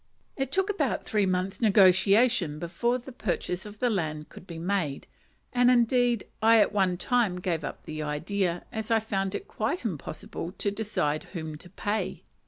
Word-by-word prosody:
It 270 -1 -2
took 385 +5 +1
about 405 - -1
three 210 -3 +1
months' 185 +3 -1
negotiation 195 -3 +4
before 185 +10 0
the 255 +2 -10
purchase 190 -4 -2
of 210 0 -11
the 245 +2 +1
land 155 -6 -2
could 185 - -13
be 170 - -7
made; 165 -5 -1 0.5
and, 245 0 +5
indeed, 245 -1 +3 0.2
I 225 +1 +6
at - - +3
one 190 -3 +2
time 225 0 +1
gave 170 -3 -1
up - - -6
the 155 0 -5
idea, 170 +4 -1
as 220 -1 -4
I 225 -1 +4
found 195 -3 -2
it 400 - -5
quite 345 - -2
impossible 165 -1 -5
to 205 - -2
decide 200 -8 -1
whom 160 -4 -6
to 180 - -12
pay. 205 +3 -3
200 Hz, 175 wpm, -28 LUFS, 175-230 Hz, 0.5 s, I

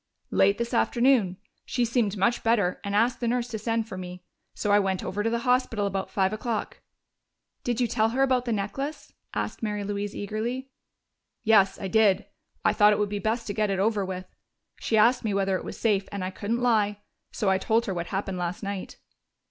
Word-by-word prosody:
"Late 200 +1 +4
this 235 +1 -3
afternoon. 235 -6 +3 0.3
She 245 -1 0
seemed 225 -3 0
much 235 +5 +2
better 210 -6 +1
and 200 0 -2
asked 235 +4 +2
the 240 - -1
nurse 240 0 0
to 220 -2 -4
send 225 +1 -1
for 190 -4 -6
me. 180 0 -8 0.3
So 205 - -1
I 205 - +6
went 190 -2 -1
over 205 +2 -2
to 225 - +1
the 235 - 0
hospital 250 -4 +2
about 195 -1 -2
five 190 0 +1
o'clock." 220 +1 -3 0.8
"Did 240 -1 -1
you 250 - +3
tell 220 -1 +1
her 260 +4 +1
about 255 -2 +2
the 240 - -1
necklace?" 250 +9 -4 0.2
asked - - -3
Mary 210 -2 -2
Louise 205 0 -3
eagerly. 235 +6 -3 0.7
"Yes, 200 -4 +4
I 195 - -3
did. 205 -1 +3 0.4
I - - +4
thought 210 -1 +6
it - - 0
would 205 -1 0
be 205 0 -3
best 225 +4 -1
to 205 - -3
get 210 -1 0
it 195 - 0
over 205 +1 +1
with. 185 -1 -5 0.5
She 220 - 0
asked 240 +4 +4
me 210 -3 -1
whether 195 -1 +1
it - - -3
was - - -7
safe, 205 -4 +1
and 200 -2 -4
I 185 - -3
couldn't 230 +5 -2
lie. 210 -4 +2 0.3
So 200 -3 0
I 190 - +2
told 225 +4 +1
her 195 - -2
what 170 -1 -3
happened 195 -1 -3
last 175 +3 -3
night." 200 -1 -5
210 Hz, 210 wpm, -26 LUFS, 195-235 Hz, 0.8 s, I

